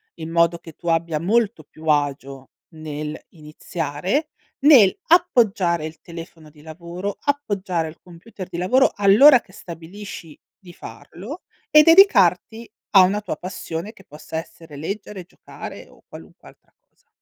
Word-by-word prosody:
in 160 -1 -8
modo 170 0 +2
che 165 -2 -14
tu 175 - -12
abbia 165 -1 0
molto 205 0 0
più 155 +2 -16
agio 140 -2 -2 0.2
nel 155 -2 -7
iniziare, 165 - -4 0.3
nel 270 - +6
appoggiare 215 - +2
il 160 0 -9
telefono 165 -2 -11
di 150 0 -20
lavoro, 170 +5 -7
appoggiare 200 - -2
al 155 - -12
computer 185 +2 -11
di - - -7
lavoro, 250 +10 +2
all'ora 220 +8 +6
che 190 - -22
stabilisci 170 -2 -10 0.2
di 175 -2 -15
farlo, 180 - -11 0.3
e 305 0 +7
dedicarti 230 - +4 0.2
a 195 - +7
una 195 +3 +2
tua 185 -7 -5
passione 180 +2 -7
che 195 - -18
possa 155 +2 -9
essere 165 -1 -10
leggere, 195 +4 -6
giocare - - -11
o - - -22
qualunque - - -15
altra - - -21
cosa. - - -42
175 Hz, 145 wpm, -21 LUFS, 160-210 Hz, 0.3 s, e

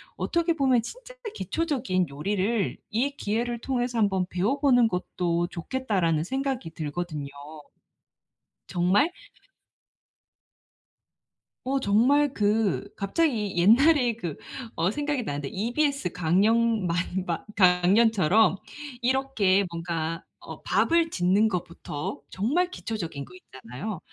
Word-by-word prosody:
어떻게 340 0 0
보면 265 -6 +2
'진짜 - - -10 0.2
기초적인 265 - -1
요리를 195 +8 -1
이 265 +6 -1
기회를 235 +3 -2
통해서 245 -1 -2
한번 195 -4 +2
배워보는 245 +6 +3
것도 175 -2 -1
좋겠다.'라는 175 - -1
생각이 265 -2 -3
들거든요. 155 -2 -5 1.4
정말 185 - +2 2.6
어 270 +1 0
정말 260 +6 +3
그 210 -2 +1
갑자기 210 - 0
옛날에 245 - +5
그 175 -10 -5 0.4
어 170 +2 +1
생각이 290 0 -2
나는데 145 -6 -4
EBS 245 - -1
강연 210 +5 +2
만 170 - 0 0.3
마 170 -3 -3
강연처럼 195 +2 +4 0.4
이렇게 240 -7 +2
뭔가 165 -1 -3 0.2
어 - - -10
밥을 335 0 +2
짓는 190 - +2
것부터 170 -5 -5
정말 295 - 0
기초적인 165 - -5
것 - - -17
있잖아요. 155 - -8
210 Hz, 240 characters per minute, -26 LUFS, 175-260 Hz, 2.6 s, 옛날에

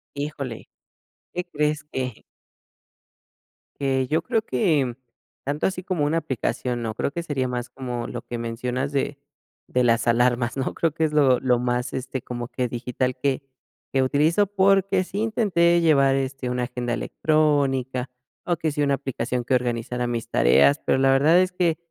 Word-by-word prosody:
Híjole, 140 -5 -5 0.6
¿qué 180 - -2
crees? 150 -2 -1
Que 125 -4 -4 1.6
que, 130 -2 +1
yo 160 +2 +2
creo 225 +5 0
que, 150 - +1 0.5
tanto 145 +2 -1
así 185 -1 -1
como 180 -5 -1
una 150 +3 +1
aplicación 125 -4 -2
no, 110 -2 -3
creo 140 - -1
que 170 +3 -4
sería 135 -5 -1
más 125 -1 -4
como 125 -3 -5
lo 120 - -5
que 120 - -5
mencionas 125 +4 -3
de 140 0 -1 0.5
de 125 - +1
las 115 0 +2
alarmas, 120 +1 +2
¿no? 135 - -1
Creo 165 -3 0
que 160 - 0
es 155 -1 +1
lo 135 -4 +4
lo 125 -2 +2
más, 125 0 -1
este, 130 0 -4
como 120 -1 -5
que 125 -1 -1
digital 125 +1 -2
que 135 +1 -1 0.5
que 135 - +3
utilizo, 155 +9 +2
porque 195 -1 +3
sí 195 - -5
intenté 195 -6 +3
llevar, 140 -4 +4
este, 135 -1 -2
una 125 0 -1
agenda 120 -1 -3
electrónica, 135 -4 +1 0.4
o 175 -1 0
que 160 -1 -1
sí 145 - -1
una 140 -1 +2
aplicación 125 -2 -3
que - - 0
organizara 125 0 -1
mis 120 -1 -3
tareas, 70 +4 +4
pero - - +3
la 135 0 +4
verdad 150 +6 +5
es 185 0 0
que, 175 -3 +1
135 Hz, 170 wpm, -24 LUFS, 125-155 Hz, 1.6 s, verdad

